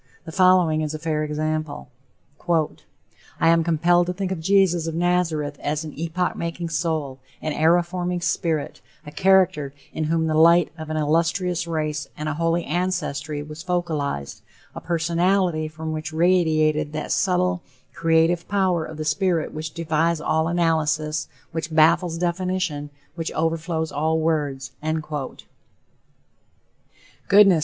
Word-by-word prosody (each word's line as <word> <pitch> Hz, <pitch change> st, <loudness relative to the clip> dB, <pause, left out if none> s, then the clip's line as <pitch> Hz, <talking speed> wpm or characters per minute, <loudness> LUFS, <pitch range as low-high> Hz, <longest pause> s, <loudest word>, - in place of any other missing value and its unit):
The 160 Hz, -, -7 dB
following 180 Hz, -3 st, +4 dB
is 155 Hz, 0 st, -2 dB
a -, -, -3 dB
fair 155 Hz, -1 st, -2 dB
sample: 155 Hz, -1 st, -3 dB, 0.6 s
"I 165 Hz, 0 st, -3 dB
am 165 Hz, 0 st, +4 dB
compelled 175 Hz, +2 st, +3 dB
to 180 Hz, -, -1 dB
think 190 Hz, 0 st, -3 dB
of 190 Hz, -, -2 dB
Jesus 175 Hz, -2 st, +3 dB
of 165 Hz, -, -3 dB
Nazareth 165 Hz, -4 st, 0 dB
as 150 Hz, +1 st, -2 dB
an 155 Hz, -2 st, -7 dB
epoch 170 Hz, +3 st, -2 dB
making 170 Hz, 0 st, -4 dB
soul, 155 Hz, -4 st, -2 dB, 0.2 s
an 155 Hz, -, -3 dB
era 165 Hz, +3 st, +4 dB
forming 180 Hz, 0 st, -3 dB
spirit, 165 Hz, -3 st, -1 dB, 0.2 s
a 150 Hz, -, -8 dB
character 175 Hz, -6 st, +2 dB, 0.2 s
in 155 Hz, -, -2 dB
whom 160 Hz, +1 st, +1 dB
the 160 Hz, -, 0 dB
light 165 Hz, +1 st, +5 dB
of 160 Hz, -1 st, -8 dB
an 155 Hz, -, -2 dB
illustrious 165 Hz, +3 st, 0 dB
race 155 Hz, -2 st, -2 dB
and 150 Hz, -, -4 dB
a 155 Hz, -, -1 dB
holy 165 Hz, +2 st, 0 dB
ancestry 155 Hz, -4 st, -2 dB
was 150 Hz, +2 st, -9 dB
focalized, 155 Hz, -, -2 dB, 0.3 s
a -, -, -7 dB
personality 170 Hz, 0 st, +1 dB
from 160 Hz, +1 st, -6 dB
which 155 Hz, 0 st, -4 dB
radiated 155 Hz, -3 st, +2 dB
that 155 Hz, -, -4 dB
subtle, 180 Hz, -1 st, +1 dB, 0.3 s
creative 165 Hz, +1 st, +2 dB
power 190 Hz, -5 st, +1 dB
of 155 Hz, 0 st, -8 dB
the 155 Hz, -, -4 dB
spirit 170 Hz, +1 st, 0 dB
which 155 Hz, 0 st, -5 dB
defies 165 Hz, 0 st, 0 dB
all 160 Hz, +1 st, +1 dB
analysis, 155 Hz, -2 st, 0 dB, 0.2 s
which 160 Hz, 0 st, -4 dB
baffles 165 Hz, +2 st, +3 dB
definition, 175 Hz, -3 st, -2 dB, 0.2 s
which 165 Hz, -1 st, -4 dB
overflows 160 Hz, 0 st, -1 dB
all 160 Hz, +2 st, 0 dB
words." 145 Hz, -5 st, -1 dB
Goodness! 155 Hz, -3 st, -4 dB
160 Hz, 140 wpm, -23 LUFS, 155-175 Hz, 0.6 s, light